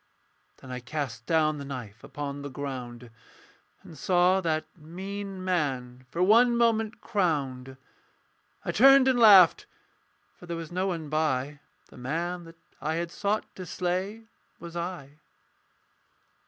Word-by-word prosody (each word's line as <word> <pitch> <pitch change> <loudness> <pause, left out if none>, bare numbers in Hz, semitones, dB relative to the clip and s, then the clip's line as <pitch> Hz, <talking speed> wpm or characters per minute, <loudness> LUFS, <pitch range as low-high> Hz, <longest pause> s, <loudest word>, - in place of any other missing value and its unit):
Then 130 - -12
I 125 - -4
cast 125 -2 -5
down 155 -2 +2
the - - -6
knife 125 -7 -8
upon 145 -1 -6
the 145 - -6
ground 125 -3 -7 0.7
And 165 - -12
saw 180 +5 +3
that 155 -2 -1
mean 190 +4 -7
man 130 -8 -2
for 170 +7 0
one 235 +5 +5
moment 225 -2 +1
crowned. 135 - -1 0.9
I - - 0
turned 270 +3 +7
and 255 -2 +3
laughed: 200 -7 +7 0.7
for 175 - -13
there 170 -1 -4
was 165 -1 -7
no 185 +2 -1
one 165 -5 -4
by 145 -2 -1 0.3
The - - -15
man 170 +7 -3
that 165 0 -14 0.2
I 155 +2 -1
had 170 0 -3
sought 205 +3 -1
to 185 - -7
slay 185 +5 -3 0.4
was 170 0 -10
I. 170 -5 -6
165 Hz, 140 wpm, -27 LUFS, 140-185 Hz, 0.9 s, turned